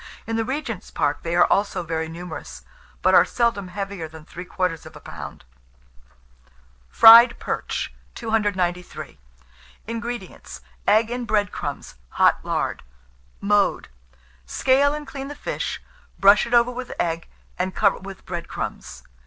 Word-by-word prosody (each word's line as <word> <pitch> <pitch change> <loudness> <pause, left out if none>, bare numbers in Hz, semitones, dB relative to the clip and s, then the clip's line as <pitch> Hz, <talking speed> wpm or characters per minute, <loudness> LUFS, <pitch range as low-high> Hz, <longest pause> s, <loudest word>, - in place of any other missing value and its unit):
In 225 - -3
the 225 - +1
Regent's 250 -5 -4
Park 145 0 -1
they 170 +1 -2
are 175 - +6
also 195 -3 0
very 160 -1 -3
numerous; 160 - -8 0.4
but - - +4
are - - +8
seldom 235 -5 0
heavier 195 -2 -5
than 155 0 -13
three 180 +3 -9
quarters 180 -3 -2
of - - -14
a - - -10
pound. - - -9 1.4
FRIED 230 - +9
PERCH. - - -3 0.2
293. 200 -6 -2 0.7
INGREDIENTS. 230 -2 -6 0.3
Egg 220 +2 +4
and 245 -1 -3
bread 205 -4 +1
crumbs, - - -6 0.2
hot - - +4
lard. - - -2 0.6
Mode. 205 0 +1 0.6
Scale 275 - +3
and 300 0 -6
clean 275 -2 -7
the 290 - -7
fish, - - -4 0.4
brush 200 +3 +6
it 235 - -5
over 235 +1 +4
with 250 0 -6
egg, 165 0 -1 0.3
and 185 +1 -2
cover 200 -2 +2
with 195 0 -10
bread 175 -2 -5
crumbs. - - -6
200 Hz, 140 wpm, -23 LUFS, 175-235 Hz, 1.4 s, FRIED